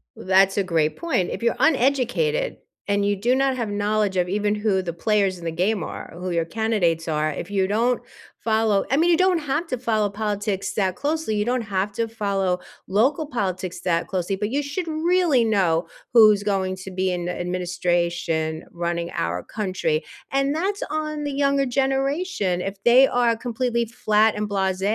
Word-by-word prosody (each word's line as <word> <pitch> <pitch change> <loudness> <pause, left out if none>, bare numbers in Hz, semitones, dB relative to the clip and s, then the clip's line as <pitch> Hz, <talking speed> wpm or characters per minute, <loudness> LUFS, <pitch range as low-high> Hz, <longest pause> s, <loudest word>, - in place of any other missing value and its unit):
That's 190 +1 +3
a 200 - +3
great 160 -4 0
point. 320 - 0
If - - -5
you're 235 - +2
uneducated 280 - +1 0.3
and 200 0 +1
you 205 0 +2
do 235 +6 +1
not 270 0 +2
have 235 -4 -3
knowledge 205 -1 0
of 180 -1 +2
even 205 +2 0
who 210 -2 +1
the 175 -2 -4
players 195 +1 +1
in 170 - -10
the 165 - -1
game 185 +3 0
are, - - -7
who 180 +1 -4
your 170 -1 0
candidates 175 -5 0
are, 155 -1 0
if 170 +5 -6
you 190 -2 +1
don't 230 +5 +1 0.4
follow 220 -3 +2
I 270 - +2
mean, 340 +3 +4
you 335 - +4
don't 370 -1 +3
have 300 +3 -2
to 255 - -2
follow 220 -4 0
politics 205 -1 -2
that 190 -3 0
closely, 305 -6 -1
you 210 0 0
don't 250 +1 0
have 200 -2 -2
to 230 +2 -1
follow 195 -5 -1 0.3
local 265 - +1
politics 185 - -3
that 170 -2 0
closely, 185 0 -2
but 210 +1 -2
you 285 +4 -1
should 330 +5 -4
really 320 -4 +2
know 180 -6 +1 0.3
who's 215 -3 +7
going 195 -2 -1
to 185 +1 -8
be 185 0 0
in 175 -1 -3
the 180 - -4
administration 175 -2 -1
running 170 0 -3
our 90 +1 -2
country. 185 -7 -2 0.3
And 275 +1 +1
that's 390 +5 -1
on 305 0 -3
the 290 - -2
younger 275 0 +2
generation, 270 - 0
if 195 +1 -5
they 250 +3 +7
are 240 -2 +2
completely 235 0 -1
flat 215 -1 +2
and 210 0 -2
blase, 190 -2 -1
210 Hz, 185 wpm, -23 LUFS, 185-255 Hz, 0.4 s, who's